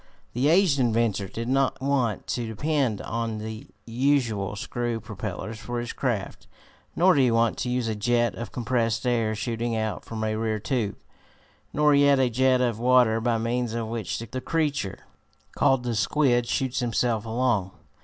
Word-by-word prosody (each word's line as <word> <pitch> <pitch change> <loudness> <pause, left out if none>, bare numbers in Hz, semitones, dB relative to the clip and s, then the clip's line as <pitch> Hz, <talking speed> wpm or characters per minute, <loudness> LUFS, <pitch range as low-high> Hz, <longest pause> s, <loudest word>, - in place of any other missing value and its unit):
The 125 +4 +1
aged 165 -3 +4
inventor 115 -5 +1
did 115 +5 -5
not 135 +1 +1
want 130 -6 0
to 120 -2 -2
depend 130 -1 -1
on 115 -1 -3
the 110 +4 -7 0.2
usual 115 -5 0
screw 120 +2 -3
propellers 110 +1 -6
for 120 0 -4
his 120 0 -5
craft, 120 -8 -3 0.5
nor 185 +2 +5
did 140 - +3
he 125 - +4
want 115 -1 +2
to 125 - -2
use 125 -1 0
a 110 - 0
jet 120 +3 +1
of 120 - -7
compressed 115 -1 -1
air, 115 -3 +1
shooting 115 +1 -2
out 110 -1 -2
from 110 -1 -5
a 110 0 0
rear 110 0 -1
tube, 110 -2 -2 0.8
nor 150 0 +3
yet 140 -1 +5
a 130 -2 +2
jet 130 +1 +3
of 120 -3 0
water, 120 -2 +4
by 115 0 +1
means 115 0 -1
of 115 -2 -3
which 110 -5 -3
the 115 +3 -6
creature 145 - -1 0.5
called 135 -2 +3
the 120 -1 -2
squid 120 +2 +2
shoots 130 0 -1
himself 115 -2 0
along. 115 -4 0
120 Hz, 170 wpm, -25 LUFS, 110-130 Hz, 0.8 s, nor